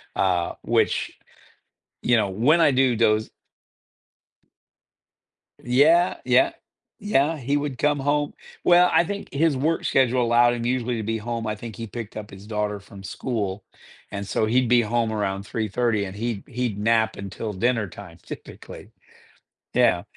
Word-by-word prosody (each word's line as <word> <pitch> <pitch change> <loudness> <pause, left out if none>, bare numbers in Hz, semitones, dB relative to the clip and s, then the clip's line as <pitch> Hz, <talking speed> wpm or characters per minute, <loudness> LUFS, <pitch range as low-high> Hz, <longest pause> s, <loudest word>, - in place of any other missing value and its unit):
uh, 90 -3 +1
which, - - 0 0.8
you 120 - +3
know, 105 -3 +1
when 135 - +3
I 150 - +5
do 130 -2 +3
doze 110 -1 +2 2.3
Yeah, 155 +8 +3
yeah, - - +4 0.5
yeah, 165 -6 +1
he 140 +2 0
would 145 -3 -3
come 145 -1 +1
home 145 +1 0 0.3
well, 180 0 +6
I - - +5
think 200 +3 -6
his 150 0 +2
work 160 +5 0
schedule 130 -1 +2
allowed 120 +1 +4
him 120 -1 -4
usually 125 -1 0
to 110 - -3
be 110 +1 -1
home 115 +1 -4
I 105 - -2
think 110 0 -9
he 115 -1 -6
picked 110 0 -7
up 105 -1 -7
his 100 +1 -12
daughter 105 -1 -2
from 100 -1 -13
school 100 -1 -3 0.5
and 100 0 -5
so 110 - 0
he'd 125 +3 +2
be 120 -1 +5
home 115 0 0
around 100 -2 -2
3:30 110 0 -1
and 95 - -8
he'd 115 -1 -3
he'd 120 -5 -3
nap 110 0 +2
until 100 +2 -5
dinner 115 +2 0
time 85 -2 -12
typically. - - -10 0.8
Yeah. - - +3
115 Hz, 155 wpm, -24 LUFS, 105-130 Hz, 2.3 s, well